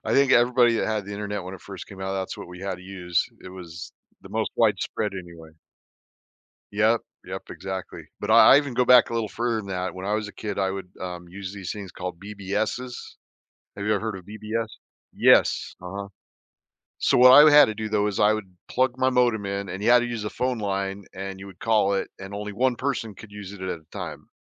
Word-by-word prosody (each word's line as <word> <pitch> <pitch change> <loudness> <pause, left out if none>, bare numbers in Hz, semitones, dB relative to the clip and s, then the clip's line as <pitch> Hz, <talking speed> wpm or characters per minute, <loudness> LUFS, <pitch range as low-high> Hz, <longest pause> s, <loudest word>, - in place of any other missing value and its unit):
I 110 - -1
think 140 +1 +4
everybody 120 0 +5
that - - 0
had 110 -2 -1
the 105 - -6
internet 105 -1 -4
when 95 +1 -7
it 95 - -11
first 100 -2 -9
came 95 -2 -12
out, 95 0 -3
that's 95 -1 -3
what - - -9
we 90 0 -10
had 95 -1 -3
to 90 - -14
use. 90 -3 -1 0.2
It 95 - -9
was 90 -1 -9 0.3
the - - -13
most - - -1
widespread 105 -2 +1
anyway. 85 -3 -9 1.2
Yep, 110 +3 +3 0.2
yep, - - -5
exactly, 95 -1 -6 0.2
but 105 - -5
I 115 +3 +8
I - - +9
even 140 -4 -2
go 125 - +3
back 125 0 +7
a - - -5
little 115 -2 0
further 115 +2 -1
than 100 -2 -5
that, 95 -1 -3
when 95 +1 -6
I 105 - 0
was 105 0 -1
a - - -9
kid, 105 -1 -5
I 95 -1 +1
would, 95 -1 -5
um, 90 -1 -6
use 95 +1 -7
these 95 -3 -5
things 100 -3 -7
called 90 -2 -6
BBSs. 105 +4 -3 0.8
Have 100 - -5
you 105 - +2
ever - - -1
heard 110 -3 -3
of 95 - -11
BBS? 110 +2 -3 0.4
Yes, - - +4
uh-huh. 100 +2 -6 0.9
So, - - +2
what 125 +1 +9
I, 145 +3 +10
uh, - - +8
had 145 -1 +9
to 110 - -4
do, 110 0 -4
though 105 -1 +1
is 100 - -3
I 105 +1 +5
would 95 -4 -6
plug 130 -1 +1
my 130 0 +3
modem 120 -5 +2
in, 100 0 -3
and 95 +3 -5
you 110 - +2
had 125 0 +8
to 120 - -1
use 115 -3 -4
a - - -2
phone 125 -1 -1
line, 100 -1 -3
and 95 0 -6
you 100 - -9
would 95 -2 -14
call 105 -3 +2
it, 100 - -1
and 95 +1 -8
only 105 +1 -5
1 125 +3 +1
person 120 -5 -3
could 110 +1 -13
use 100 -1 -8
it 100 - -11
at 95 - -3
a - - -25
time. - - -7
105 Hz, 240 wpm, -25 LUFS, 95-115 Hz, 1.2 s, I